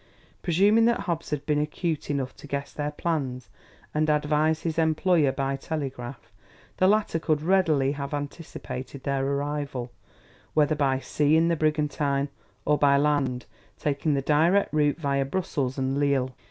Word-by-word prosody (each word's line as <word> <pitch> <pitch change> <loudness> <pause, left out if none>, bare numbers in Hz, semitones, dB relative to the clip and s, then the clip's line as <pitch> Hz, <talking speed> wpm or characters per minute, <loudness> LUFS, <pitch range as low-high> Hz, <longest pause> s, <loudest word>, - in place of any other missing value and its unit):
Presuming 200 +6 +4
that 235 -3 +2
Hobbs 170 -4 -3
had 145 -1 -3
been 150 -1 +1
acute 150 +1 -3
enough 135 -3 -2
to - - -11
guess 140 0 -4
their 145 0 -2
plans 145 -6 -3 0.4
and 155 +1 +1
advise 150 +1 +1
his 165 -1 -1
employer 160 -2 +3
by 135 0 -1
telegraph, 135 -4 -6 0.5
the 185 - +4
latter 205 -4 +2
could 155 -2 0
readily 160 -7 +3
have 140 -1 -5
anticipated 145 -2 -6
their 140 -1 0
arrival, 140 -2 -2 0.6
whether 150 0 +4
by 140 -3 +1
sea 150 +3 +2
in 165 +1 +3
the 170 - +2
brigantine, 150 -2 0 0.4
or 150 0 +2
by 140 -1 +5
land, 140 -4 +1 0.3
taking 145 +1 0
the 135 - -1
direct 165 +8 +3
route 150 -1 +2
via 140 -4 0
Brussels 135 -4 -2
and 135 +1 0
Lille. 135 -3 +1
150 Hz, 155 wpm, -26 LUFS, 140-160 Hz, 0.6 s, by